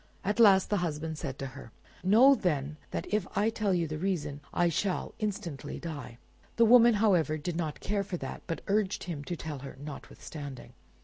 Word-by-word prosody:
At 205 +4 -1
last 195 -4 +6
the 205 - +3
husband 160 -2 -3
said 135 -4 -4
to 135 - -4
her— 120 - -11 0.3
"Know 230 +9 +7
then, 150 - -1
that - - -3
if 210 -3 +1
I 215 +2 +3
tell 215 -3 0
you 175 -2 +2
the 155 0 -4
reason, 150 -6 -2
I 175 - +2
shall 180 +3 -1
instantly 190 -9 -4
die." 145 -8 -7 0.4
The 230 - +5
woman, 235 0 +7
however, 180 -7 +3
did 160 +3 -4
not 160 -3 -3
care 200 0 0
for 195 -2 -4
that, 135 -4 -6
but 165 - -3
urged 205 -1 0
him 160 -5 -5
to 175 - -3
tell 155 -4 -5
her 135 0 -9
notwithstanding. 145 -1 -9
175 Hz, 190 wpm, -30 LUFS, 150-205 Hz, 0.4 s, Know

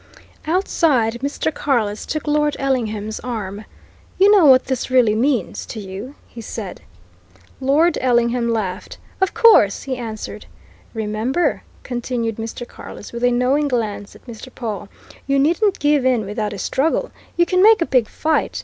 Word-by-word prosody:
Outside, 300 - +1
Mr. 285 +3 -2
Carless 220 -9 -1
took 310 0 -3
Lord 295 -1 +1
Ellingham's 220 -6 -2
arm. 215 -4 -5 0.5
"You 395 +2 +6
know 375 -6 +6
what 260 -1 +6
this 260 -1 -3
really 250 -4 +4
means 250 +2 0
to 225 - -6
you?" 200 +7 -8
he 235 - -10
said. 210 -4 -7 0.8
Lord 290 +6 +2
Ellingham 240 -1 +2
laughed. 205 -4 -3 0.2
"Of 380 - +1
course!" 320 - +5
he 260 -2 -4
answered. 225 -3 -7 0.5
"Remember," 220 +9 -1 0.2
continued 240 -3 -3
Mr. 225 +2 -6
Carless, 210 - -11
with 235 +1 -5
a 245 - +5
knowing 255 +4 +1
glance 215 -6 -3
at - - -18
Mr. 235 +1 -10
Pawle, 210 -6 -5 0.4
"you 275 0 +2
needn't 345 +8 +2
give 290 -2 +2
in 250 -4 +2
without 210 +1 -3
a 205 - -6
struggle! 315 - -1 0.3
You 345 - +4
can 365 +1 +1
make 440 +2 +7
a 335 - +1
big 250 -7 +2
fight. 315 0 -1
245 Hz, 155 wpm, -20 LUFS, 220-290 Hz, 0.8 s, make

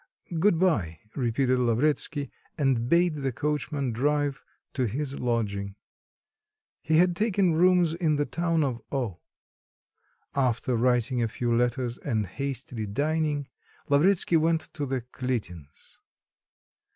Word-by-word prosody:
"Good 180 0 +4
bye," 105 - +1 0.2
repeated 130 0 +1
Lavretsky, 140 +4 0 0.3
and 130 -5 +1
bade 170 -1 +3
the 135 -2 -1
coachman 145 0 -2
drive 145 +3 0 0.3
to 130 -3 0
his 140 +5 -4
lodging. 100 -5 -2 1.1
He 160 0 +2
had 175 +1 +4
taken 200 -3 +2
rooms 175 0 +4
in 165 -3 +1
the 145 0 +1
town 165 -1 0
of 125 -4 -2
O... 120 -11 -2 1.1
After 125 -2 +1
writing 125 0 +2
a 115 - +2
few 120 +1 -1
letters 120 0 0
and 110 -6 -1
hastily 125 0 -4
dining, 145 +4 -1 0.4
Lavretsky 165 +4 +4
went 160 0 0
to 145 -2 -3
the 130 -1 -1
Kalitins'. 115 - -6
135 Hz, 120 wpm, -27 LUFS, 120-155 Hz, 1.1 s, Good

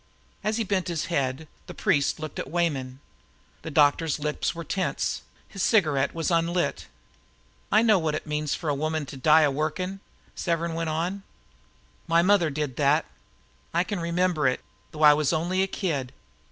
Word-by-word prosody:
As 215 +1 0
he 230 - 0
bent 195 -3 -1
his 170 -2 -2
head, 135 +1 -1 0.2
the - - -9
priest 150 -9 +1
looked 155 -2 -6
at - - -5
Weyman. 140 -7 -1 0.6
The - - -6
doctor's 150 +1 +3
lips 150 +2 -2
were 170 - -5
tense. 185 +4 -2 0.3
His 195 - -7
cigarette 150 - +2
was 165 +1 -1
unlighted. 170 - 0 0.9
"I 215 +2 +5
know 215 -4 +5
what 160 -2 -1
it - - -5
means 150 -1 -1
for 160 - -6
a 145 - +2
woman 155 +1 -2
to 140 - -9
die 155 +4 +5
a 145 - +3
workin'," 160 +7 -2 0.3
Severn 170 -1 -1
went 165 0 -2
on. 175 +5 -2 0.9
"My 165 +1 +4
mother 185 -4 +4
did 145 -3 -3
that. 145 +2 +3 0.7
I 170 - +4
can 200 0 -4
remember 170 -3 +1
it, 130 - 0 0.3
though 155 0 -4
I 150 0 +9
was 150 -1 +1
only 175 +3 0
a 190 - +2
kid. 150 -11 -2
160 Hz, 175 wpm, -26 LUFS, 150-175 Hz, 0.9 s, I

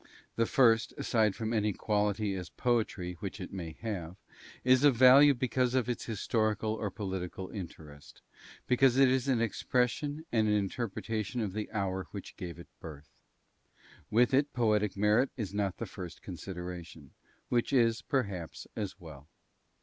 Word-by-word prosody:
The 115 0 +1
first, 115 -4 +3
aside 110 -4 +1
from 110 0 -3
any 105 -2 +1
quality 105 0 0
as 90 -2 -5
poetry 110 -7 -1
which 100 +2 -6
it 90 - -7
may 85 -4 -5
have, 95 -6 -4 0.5
is 130 +1 +5
of 145 -4 +6
value 135 +4 +8
because 125 0 0
of 125 -2 +1
its 120 -2 -3
historical 110 0 0
or 110 -2 -3
political 95 -2 -5
interest, 80 -7 -10 0.4
because 130 0 +4
it 135 -1 +6
is 130 0 +1
an 125 -4 +2
expression 125 +7 -1
and 110 -2 +2
an 105 - +3
interpretation 110 +2 -2
of 105 -5 -2
the 105 0 -4
hour 95 -3 -2
which 100 - -8
gave 90 -4 -7
it 85 - -11
birth. 75 -2 -10 1.0
With 120 +4 +3
it, 140 +2 +2
poetic 105 -4 +1
merit 105 +6 +3
is 105 -5 -4
not 100 -2 -1
the 115 - -4
first 90 -4 -9
consideration, 90 -5 -8 0.4
which 120 +2 +1
is, 115 -4 +3
perhaps, 100 - -3
as 105 -4 -4
well. 75 -4 -12
105 Hz, 155 wpm, -31 LUFS, 95-120 Hz, 1.0 s, value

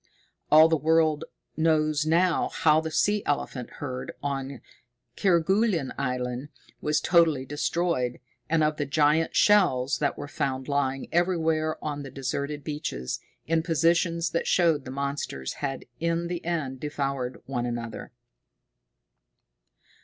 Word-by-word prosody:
All 155 +1 +9
the 165 - +2
world 155 0 +2 0.3
knows 155 -1 +2
now 170 +2 +2
how 155 0 +3
the 160 - -4
sea 205 +6 +2
elephant 135 -3 -2
herd 130 -3 -5
on 135 -2 -3 0.6
Kerguelen 190 - +2
Island 125 +1 -3 0.3
was 150 0 +1
totally 160 -5 +3
destroyed, 145 -3 -1 0.3
and 160 -1 +3
of 150 0 +1
the 145 - -2
giant 150 +2 +2
shells 135 -11 +4
that 145 - 0
were 145 - -6
found 130 -2 -3
lying 135 -2 -1
everywhere 160 -3 +1
on 145 -1 -3
the 140 - -7
deserted 140 +2 -4
beaches, 145 - -4 0.3
in 165 +1 +1
positions 170 +1 +1
that 170 - -1
showed 165 -6 +3
the - - -7
monsters 140 - -3
had 135 -2 -3
in 170 +1 -1
the 175 -1 -4
end 155 -6 -2
devoured 135 -3 -3
one 125 -2 -2
another. 120 -1 -5
150 Hz, 130 wpm, -26 LUFS, 135-165 Hz, 0.6 s, All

